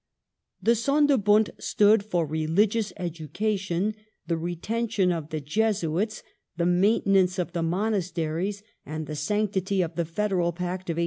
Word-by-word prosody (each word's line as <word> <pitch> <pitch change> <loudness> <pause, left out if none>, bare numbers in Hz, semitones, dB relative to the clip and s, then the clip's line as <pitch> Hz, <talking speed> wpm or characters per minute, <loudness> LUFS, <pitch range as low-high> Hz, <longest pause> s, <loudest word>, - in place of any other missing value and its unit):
The 230 - +4
Sonderbund 235 -4 +3
stood 210 +1 +4
for 180 -5 0
religious 195 +8 +1
education, 185 +3 -2 0.3
the 170 - 0
retention 190 +4 -1
of 160 -3 -3
the 155 - -3
Jesuits, 205 +4 -1 0.3
the 170 - +1
maintenance 190 0 +3
of 175 -1 -2
the 170 - -1
monasteries, 185 0 -1 0.2
and 155 +1 -5
the 150 - -6
sanctity 195 +3 0
of 165 0 -5
the 170 0 -1
federal 175 0 0
Pact 180 +1 -4
of 165 - 0
1815. - - -3
185 Hz, 135 wpm, -26 LUFS, 165-210 Hz, 0.3 s, The